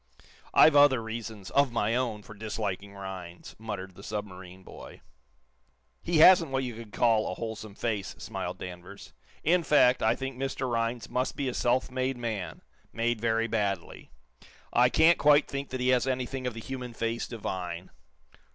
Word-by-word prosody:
"I've 155 - +7
other 145 -3 +6
reasons, 110 -3 -7
of 140 -2 +3
my 115 -1 0
own, 115 -5 -2
for 110 - -12
disliking 100 -2 -4
Rhinds," 95 -3 -8
muttered 100 -4 -6
the 95 - -13
submarine 95 -3 -7
boy. - - -12 1.0
"He 170 - 0
hasn't 165 0 +7
what 135 0 -1
you 125 -2 -4
could 110 -1 -10
call 115 -2 +2
a - - -4
wholesome 110 -2 -6
face," 105 -5 -3
smiled - - -5
Danvers. 90 -1 -10 0.3
"In 175 +2 +3
fact, 145 -5 +4
I - - +3
think 135 -1 -5
Mr. 135 0 -2
Rhinds 115 0 -1
must 125 +1 -2
be 140 - -2
a 125 - -2
self 125 +2 +1
made 130 0 -1
man, 110 -8 -4 0.3
made 115 -1 -1
very 115 0 +1
badly. 100 -6 -3 0.6
I 125 +1 +5
can't 165 +4 +5
quite 145 0 +5
think 140 0 -5
that 130 - -4
he 125 0 +1
has 130 0 +3
anything 130 0 -2
of 120 - -4
the 115 - -6
human 125 -1 -6
face 115 +1 -2
divine." 90 -6 -5
115 Hz, 170 wpm, -28 LUFS, 105-130 Hz, 1.0 s, I've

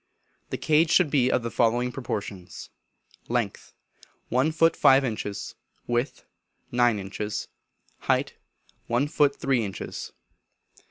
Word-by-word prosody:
The - - -3
cage 155 +1 +3
should 175 -4 +4
be 130 -3 +3
of 125 - +1
the 115 - -3
following 120 +2 +2
proportions: 100 -7 -6 0.6
Length, - - -2 0.5
one 130 +6 +2
foot 165 +1 +3
five 135 0 +5
inches; 105 -4 -4 0.3
width, 120 +3 -2 0.5
nine 120 -2 +3
inches; 105 +2 -4 0.5
height, - - 0 0.5
one 120 +5 +1
foot 145 -1 +2
three 130 -4 +1
inches. 95 -2 -6
125 Hz, 115 wpm, -26 LUFS, 110-140 Hz, 0.6 s, five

